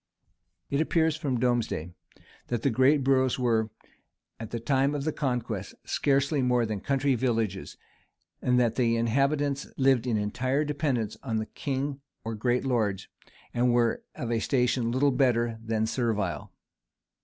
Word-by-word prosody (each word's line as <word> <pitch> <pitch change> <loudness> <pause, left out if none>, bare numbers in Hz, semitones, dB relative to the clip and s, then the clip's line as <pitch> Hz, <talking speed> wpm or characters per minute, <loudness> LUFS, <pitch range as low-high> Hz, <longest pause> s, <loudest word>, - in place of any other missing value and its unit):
It 140 +2 +2
appears 160 -1 +2
from 140 -6 -2
Domesday, 120 -9 0 0.6
that 120 -2 -2
the 140 - +2
greatest 130 +4 +4
boroughs 130 -1 +2
were, 115 -3 +1 0.7
at 115 -2 -6
the 115 - -4
time 135 +4 +1
of 140 - -2
the 155 - 0
conquest, 120 -7 -3
scarcely 140 +1 +1
more 125 -2 +2
than 105 -2 -3
country 140 +4 +1
villages; 115 -5 -1 0.6
and 125 -1 +3
that 115 -2 +1
the 115 -2 +2
inhabitants 140 +4 +1
lived 130 -2 +3
in 115 -3 +1
entire 130 +8 0
dependence 140 -7 -1
on 115 -5 -2
the 110 - -1
king 140 +3 -3 0.2
or 115 - -4
great 120 +4 0
lords, 105 -7 0 0.4
and 120 0 +2
were 120 -1 +2
of 120 -2 -4
a 115 - +1
station 125 -1 +1
little 140 +3 +3
better 120 -3 +1
than 110 -1 0
servile. 110 -5 -2
125 Hz, 150 wpm, -28 LUFS, 115-135 Hz, 0.7 s, greatest